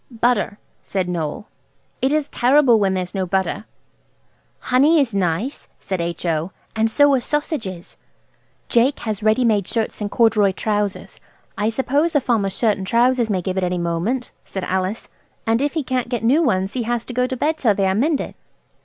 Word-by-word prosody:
"Butter," 235 -3 0 0.2
said 190 -2 -2
Noël; 170 +2 -3 0.6
"it 265 - +2
is 300 -1 +1
terrible 250 -2 +4
when 195 -2 +1
there 185 - 0
is 180 - -10
no 190 -2 -2
butter." 190 +3 -1 0.9
"Honey 290 +6 +3
is 260 -6 +1
nice," 195 - -1
said 190 -3 -3
H.O., 170 0 -2 0.2
"and 220 0 +2
so 285 +4 +4
are 260 - +2
sausages." 240 - -3 0.7
"Jake 250 +4 +2
has 215 -3 -3
ready 220 +4 +3
made 210 -5 +2
shirts 225 -1 -2
and 205 - -2
corduroy 215 -3 +3
trousers. 205 0 -2 0.4
I 210 +1 0
suppose 280 +7 0
a - - +6
farmer's 205 -7 0
shirt 215 -4 +2
and 190 - -5
trousers 240 +1 +2
may 185 -3 0
give 190 +1 -1
at - - -2
any 180 0 0
moment," 175 +9 -2
said 190 - -6
Alice, 190 +4 -2 0.4
"and 225 +2 +2
if 290 +3 -1
he 315 - 0
can't 255 -2 -2
get 240 -2 -2
new 270 +8 +4
ones 190 - 0
he 255 - -2
has 235 0 -2
to 245 - -7
go 250 +1 +1
to 260 - -4
bed 310 +5 0
till 220 -6 +3
they 195 - +1
are 190 - +2
mended." 280 +8 0
220 Hz, 190 wpm, -21 LUFS, 190-255 Hz, 0.9 s, a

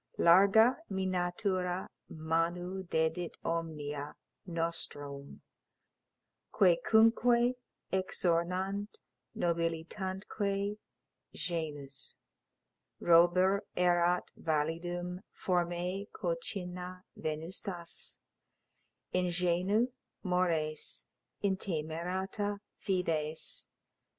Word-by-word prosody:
Larga 200 +8 +7
mî 190 -1 -1
natura 180 0 0 0.2
manu 170 +4 -1
dedit 160 +2 0
omnia, 150 -3 -3 0.3
nostrum 145 -4 -3 1.1
Quæcunque 240 - +5 0.4
exornant 185 +2 0 0.4
nobilitantque 190 +4 -1 0.6
genus: 150 -5 -3 0.8
Robur 175 +3 +5 0.2
erat 175 0 +3
validum, 175 +3 -1 0.2
formæ 180 +2 0
concinna 185 - -4
venustas, 170 +3 -4 1.0
Ingenui 180 +5 +2 0.3
mores, 170 -5 0 0.4
intemerata 190 +2 -1 0.2
fides. 160 -5 -2
180 Hz, 50 wpm, -33 LUFS, 165-190 Hz, 1.1 s, Larga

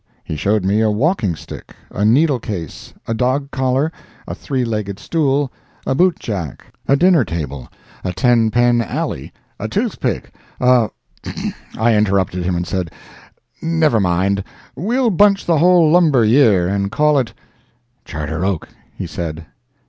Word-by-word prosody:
He - - -5
showed 100 +5 0
me 100 +3 +2
a 110 - +3
walking 110 - 0
stick, 70 - -11 0.2
a - - -5
needlecase, 110 - 0 0.2
a 115 - -1
dog 130 +4 0
collar, 130 +4 0 0.4
a - - -4
three 130 -3 -2
legged 105 -4 -3
stool, 140 +1 0 0.3
a - - 0
boot 180 +5 +3
jack, 90 - -6
a 140 - +4
dinner 175 -1 +4
table, 70 - -5 0.3
a 95 - -2
ten 115 +4 +3
pen 120 +1 +3
alley, 115 - -4 0.3
a - - -3
tooth - - -2
pick, - - -2 0.3
a—— 125 -3 +4 0.9
I 115 +2 +3
interrupted 95 -4 +1
him 90 0 0
and 85 0 -2
said, 90 -2 -3 0.7
"Never 160 -7 +2
mind—we'll 100 - -1
bunch 200 +1 +3
the 165 -3 +2
whole 175 -2 +5
lumber 155 -9 +4
year, 110 -7 +4
and 100 +1 -1
call 150 +3 +3
it—" 125 -4 -3 0.7
"Charter 80 +2 -4
Oak," 95 -4 -2 0.3
he - - -4
said. 80 -1 -5
115 Hz, 145 wpm, -18 LUFS, 95-145 Hz, 0.9 s, whole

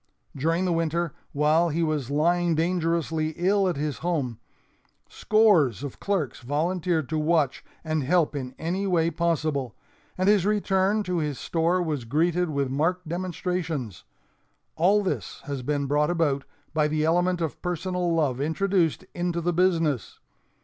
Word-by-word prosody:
During 165 +6 0
the 180 - +1
winter, 165 0 -1 0.2
while 155 +4 +3
he 165 +2 0
was 150 -5 -1
lying 170 +3 +2
dangerously 165 -2 0
ill 195 +2 +2
at 175 - -1
his 145 0 -3
home, 145 -10 -2 0.7
scores 195 - +3
of 140 - -6
clerks 180 - -1
volunteered 160 +3 -1
to 155 0 0
watch 155 -3 +1 0.2
and 155 -1 -1
help 155 +1 +2
in 130 -2 -5
any 185 +5 -2
way 170 -3 +2
possible, 155 - -1 0.4
and 185 +1 +1
his 205 -3 +5
return 205 0 +1
to 180 -2 -1
his 150 -4 -2
store 170 +2 0
was 150 -7 -3
greeted 170 +7 +1
with 140 -3 -1
marked 165 +5 0
demonstrations. 170 - -3 0.7
All 200 +6 +3
this 190 - -3
has 140 -3 -4
been 145 +2 -1
brought 150 +2 +1
about 155 -5 0 0.3
by 155 -1 +2
the 155 0 0
element 175 +2 +2
of 165 -3 -3
personal 180 0 -1
love 145 -6 +1
introduced 165 +2 +1
into 175 -1 -1
the 175 +1 0
business. 165 - +1
165 Hz, 150 wpm, -26 LUFS, 150-180 Hz, 0.7 s, his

